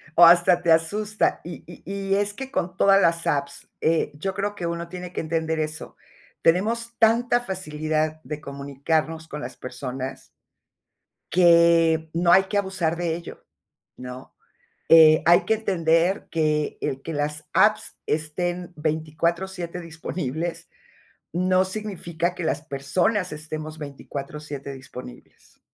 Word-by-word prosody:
O 170 - +9
hasta 175 +1 +6
te 170 -2 +2
asusta. 205 +6 +1
Y 170 +1 -8
y 175 - -13
y 195 +1 -1
es 205 0 0
que 265 +4 -7
con 180 -6 -2
todas 195 0 +5
las 165 0 +2
apps, 140 -1 -2
eh, 160 -1 +1
yo 190 +6 -3
creo 205 +1 -2
que 175 -4 -5
uno 170 0 -4
tiene 180 -1 -7
que - - -2
entender 160 0 -1
eso. 155 +1 -5 0.4
Tenemos 230 +7 +1
tanta 235 +2 +3
facilidad 155 -6 -2
de 150 -1 -6
comunicarnos 150 +3 -2
con 150 -1 -7
las - - -7
personas, 130 +1 -6 1.0
que, 170 -2 +5
no 170 +1 +3
hay 190 +1 +7
que 205 +2 -1
abusar 190 -4 -1
de 170 -1 -1
ello, 170 - -10 0.5
¿no? 125 0 -10 0.5
Eh, 155 -1 +8
hay 175 +1 +5
que 220 - +3
entender 175 -3 +1
que, 155 -2 0
el 135 0 -3
que 165 - -6
las 150 +1 -2
apps 215 0 +3
estén 175 +3 -2
24/7 170 +4 -2
disponibles, 165 -1 -5 0.6
no 185 +1 +3
significa 185 -4 -3
que 175 - -5
las 160 - -1
personas 175 +7 0
estemos 155 0 -6
24/7 140 0 -7
disponibles. 130 - -12
165 Hz, 135 wpm, -24 LUFS, 155-185 Hz, 1.0 s, O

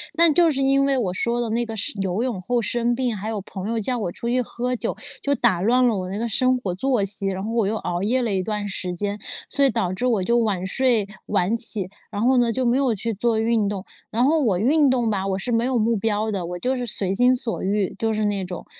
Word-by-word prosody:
但 335 -1 +5
就 335 +1 +4
是 275 -2 0
因 275 +1 +3
为 275 -1 +2
我 220 -8 0
说 235 +6 -1
的 235 - -2
那 235 +2 0
个 225 - -6
生 205 -1 -1
游 190 +4 -1
泳 245 -7 -2
后 240 +5 -1
生 240 +1 0
病， 245 -3 -1
还 205 +3 -4
有 215 -2 -3
朋 190 0 -7
友 230 0 -1
叫 245 +4 -1
我 190 -7 -3
出 235 - -5
去 250 +1 +1
喝 250 +2 -3
酒， - - -3 0.3
就 280 - +1
打 235 -8 +2
乱 250 +4 +3
了 225 - +1
我 185 -1 -4
那 205 - -4
个 235 - -1
生 255 +2 +3
活 185 -7 -3
作 245 +1 +1
息。 195 0 +5
然 190 0 -4
后 220 - -4
我 230 -3 +1
又 220 +2 -1
熬 175 -1 -3
夜 250 +5 +1
了 230 -3 -1
一 190 -1 0
段 210 0 -3
时 185 -2 -3
间， 205 +3 -3 0.3
所 280 -1 +3
以 265 - +4
导 180 -4 -1
致 185 +7 -3
我 225 -6 +1
就 235 +5 +2
晚 210 -6 0
睡 235 -1 +2 0.2
晚 195 +6 +1
起， 210 -5 0 0.2
然 205 - -3
后 255 +2 +3
呢， 240 -1 +3
就 260 - -1
没 245 +1 +2
有 265 -4 +2
去 225 +3 -3
做 225 +1 +1
运 225 -2 +1
动。 200 -2 -4 0.3
然 235 +3 +1
后 310 +4 +3
我 205 -10 +1
运 290 +6 +3
动 245 -3 +1
吧， 195 -2 -1
我 195 0 -1
是 245 - -3
没 230 +1 +1
有 255 -2 0
目 225 +1 +1
标 215 +1 -1
的， 190 -4 -2
我 175 +1 -6
就 255 +5 -1
是 250 -1 -3
随 200 -4 0
心 245 +5 +4
所 245 -2 -4
欲， 200 0 -1
就 225 0 0
是 215 0 -1
那 200 -2 -1
种， 180 -1 -7
225 Hz, 295 characters per minute, -22 LUFS, 200-250 Hz, 0.3 s, 但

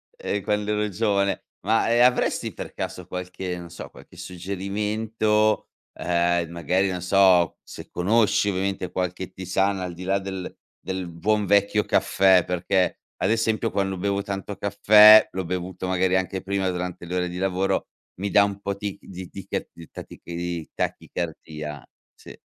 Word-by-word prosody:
Eh, 100 - -3
quando 105 +2 -1
ero 105 0 0
giovane. 100 -1 0 0.2
Ma, 110 +3 +2
ehm, 120 - +5
avresti 125 0 +1
per - - -8
caso 90 -1 -5
qualche 90 0 -5
non 85 -1 -9
so, 85 - -9
qualche - - -16
suggerimento, 105 +4 -1 0.3
ehm, 85 -1 0
magari 90 +3 0
non 90 -1 -3
so, 90 -2 +4
se - - -11
conosci 105 +2 +2
ovviamente, 95 -1 -2
qualche 90 0 -3
tisana 95 +1 0
al 90 -1 -5
di 90 - -9
là 95 +2 +1
del 95 -1 -6 0.2
del 95 -1 -4
buon 105 +5 0
vecchio 100 +2 +3
caffè 95 -2 +3
perché, 90 +1 0 0.2
ad - - 0
esempio 115 0 +1
quando 95 -1 -1
bevo 100 +1 -1
tanto 100 0 -5
caffè, 105 +2 +7
l'ho 95 0 -2
bevuto 90 +1 -4
magari 95 0 +1
anche 95 0 -1
prima 95 -1 -1
durante 90 -1 -4
le 90 - -4
ore 90 0 0
di 90 - -6
lavoro, 95 0 0 0.3
mi 100 - -1
dà 100 +2 +5
un 100 0 -5
po' 100 0 -3
tic 100 -1 -6
di 95 -1 -8
di 95 -1 -9
ca - - -1
di 85 -1 -13
tatichi 85 - -10
di 85 -2 -4
tachicardia, 75 -3 -5 0.3
sì. - - -15
95 Hz, 165 wpm, -24 LUFS, 90-100 Hz, 0.3 s, caffè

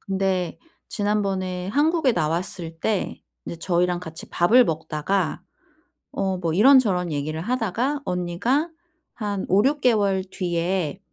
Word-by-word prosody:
근데 190 -2 -1 0.3
지난번에 195 -3 -1
한국에 300 +2 +2
나왔을 165 -1 -3
때 205 0 -2 0.2
이제 170 - -6
저희랑 175 0 0
같이 160 -2 -9
밥을 225 +9 +5
먹다가 160 +4 -1 0.7
어 190 -1 -1
뭐 165 -3 -2
이런저런 205 -6 +4
얘기를 155 +2 -3
하다가 250 - -1
언니가 185 - 0 0.5
한 205 -3 -3
5-6 265 +10 +3
개월 200 -6 +2
뒤에 180 -2 -2
190 Hz, 245 characters per minute, -23 LUFS, 175-215 Hz, 0.7 s, 밥을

